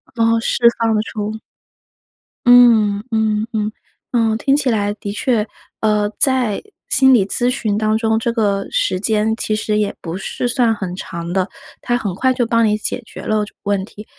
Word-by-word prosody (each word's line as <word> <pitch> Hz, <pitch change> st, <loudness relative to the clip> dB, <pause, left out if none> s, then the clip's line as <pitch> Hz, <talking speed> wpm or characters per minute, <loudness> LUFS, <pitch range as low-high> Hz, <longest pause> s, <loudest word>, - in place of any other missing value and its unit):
哦， 230 Hz, -1 st, +2 dB
释 235 Hz, +1 st, +2 dB
放 225 Hz, -1 st, +1 dB
了 215 Hz, -, +1 dB
出。 215 Hz, -1 st, -5 dB, 1.1 s
嗯， 230 Hz, -5 st, +6 dB
嗯 220 Hz, -1 st, 0 dB
嗯， 215 Hz, -1 st, -1 dB, 0.4 s
嗯， 225 Hz, -2 st, +1 dB
听 275 Hz, +4 st, +2 dB
起 280 Hz, -3 st, +1 dB
来 205 Hz, -3 st, 0 dB
的 200 Hz, -1 st, -6 dB
确， 220 Hz, -1 st, 0 dB, 0.3 s
呃， 210 Hz, -1 st, +1 dB
在 255 Hz, -6 st, +3 dB, 0.3 s
心 265 Hz, -1 st, +5 dB
理 215 Hz, -6 st, +4 dB
咨 240 Hz, +5 st, +1 dB
询 220 Hz, -5 st, -1 dB
当 215 Hz, 0 st, +1 dB
中， 220 Hz, 0 st, +1 dB
这 230 Hz, +1 st, -1 dB
个 200 Hz, -4 st, 0 dB
时 185 Hz, -, 0 dB
间 215 Hz, +1 st, +1 dB
其 215 Hz, -, -1 dB
实 215 Hz, 0 st, -1 dB
也 210 Hz, -1 st, -1 dB
不 165 Hz, +1 st, -5 dB
是 195 Hz, +5 st, -4 dB
算 235 Hz, -3 st, +2 dB
很 190 Hz, -4 st, -5 dB
长 170 Hz, -2 st, -6 dB
的， 185 Hz, 0 st, 0 dB, 0.3 s
他 240 Hz, -1 st, 0 dB
很 205 Hz, -6 st, -3 dB
快 260 Hz, +8 st, +1 dB
就 250 Hz, -2 st, 0 dB
帮 230 Hz, 0 st, +2 dB
你 210 Hz, 0 st, +1 dB
解 215 Hz, -, -2 dB
决 -, -, -10 dB
了 215 Hz, -1 st, 0 dB
就 -, -, -16 dB
问 200 Hz, -2 st, 0 dB
题。 210 Hz, +1 st, -12 dB
220 Hz, 200 characters per minute, -18 LUFS, 205-235 Hz, 1.1 s, 嗯